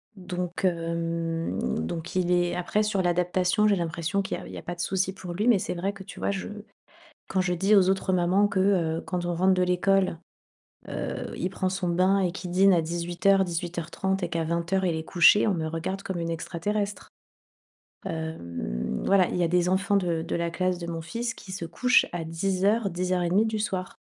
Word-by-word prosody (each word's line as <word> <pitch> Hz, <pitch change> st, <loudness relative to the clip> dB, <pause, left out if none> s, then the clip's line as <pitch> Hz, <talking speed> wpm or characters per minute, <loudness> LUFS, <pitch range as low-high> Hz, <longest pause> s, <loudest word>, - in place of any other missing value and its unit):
donc, 180 Hz, -2 st, -5 dB
hem, 165 Hz, -, -1 dB, 0.3 s
donc 165 Hz, -, -5 dB
il 180 Hz, -1 st, +1 dB
est 175 Hz, 0 st, +2 dB
après 180 Hz, +4 st, 0 dB
sur 210 Hz, -2 st, 0 dB
l'adaptation 180 Hz, +3 st, +2 dB
j'ai 205 Hz, -, +4 dB
l'impression 170 Hz, +2 st, -1 dB
qu'il 195 Hz, -, -3 dB
y -, -, -8 dB
a -, -, -10 dB
il -, -, -10 dB
y -, -, -6 dB
a -, -, -6 dB
pas 175 Hz, -, -5 dB
de 175 Hz, -, -20 dB
souci 190 Hz, +2 st, 0 dB
pour 180 Hz, -2 st, -7 dB
lui 210 Hz, +6 st, -1 dB
mais 230 Hz, -5 st, +5 dB
c'est -, -, -3 dB
vrai 185 Hz, +3 st, -2 dB
que, 195 Hz, -1 st, -11 dB
tu 190 Hz, -, -11 dB
vois, -, -, 0 dB
je 195 Hz, -, -4 dB, 0.8 s
quand 190 Hz, -, +1 dB
je 180 Hz, -1 st, 0 dB
dis 195 Hz, +5 st, +3 dB
aux 190 Hz, -2 st, +5 dB
autres 190 Hz, 0 st, +1 dB
mamans: 185 Hz, +3 st, +3 dB
«Que, 200 Hz, -2 st, -1 dB
heu, 175 Hz, -4 st, +2 dB
quand 180 Hz, -1 st, -3 dB
on 175 Hz, -, -1 dB
rentre 185 Hz, +2 st, +4 dB
de 185 Hz, 0 st, +2 dB
l'école, 180 Hz, 0 st, +2 dB, 0.7 s
heu, -, -, -4 dB
il 180 Hz, -, -1 dB
prend 185 Hz, 0 st, -1 dB
son 190 Hz, -1 st, -2 dB
bain 185 Hz, +3 st, +3 dB
et 180 Hz, -2 st, +1 dB
qu'il 180 Hz, -1 st, -6 dB
dîne 190 Hz, +2 st, +5 dB
à 170 Hz, -, +2 dB
18:00-18:30 175 Hz, +1 st, 0 dB
et 175 Hz, -, 0 dB
qu'à 165 Hz, -1 st, -1 dB
20:00 170 Hz, +4 st, 0 dB
il 165 Hz, -, 0 dB
est 160 Hz, -, -4 dB
couché» 175 Hz, +4 st, +5 dB
on 205 Hz, -, +2 dB
me 160 Hz, -2 st, -2 dB
regarde 175 Hz, +4 st, -4 dB
comme 190 Hz, -3 st, -4 dB
une 165 Hz, 0 st, -2 dB
extraterrestre. 200 Hz, +5 st, -3 dB, 1.0 s
Hem 85 Hz, -, -4 dB
voilà, 195 Hz, -2 st, +4 dB
il -, -, -3 dB
y 175 Hz, -, +1 dB
a 165 Hz, -, +1 dB
des 180 Hz, 0 st, +2 dB
enfants 195 Hz, +2 st, +2 dB
de 170 Hz, -4 st, 0 dB
de 165 Hz, -, -2 dB
la 170 Hz, 0 st, -1 dB
classe 185 Hz, +1 st, -1 dB
de 170 Hz, -, -6 dB
mon 165 Hz, -1 st, -4 dB
fils 230 Hz, +7 st, -3 dB
qui 190 Hz, -, -11 dB
se 185 Hz, -3 st, -4 dB
couchent 250 Hz, +9 st, +3 dB
à 170 Hz, -2 st, -3 dB
10:00-10:30 185 Hz, +1 st, +1 dB
du 220 Hz, -1 st, -2 dB
soir, 195 Hz, +2 st, -3 dB
180 Hz, 210 wpm, -26 LUFS, 170-195 Hz, 1.0 s, mais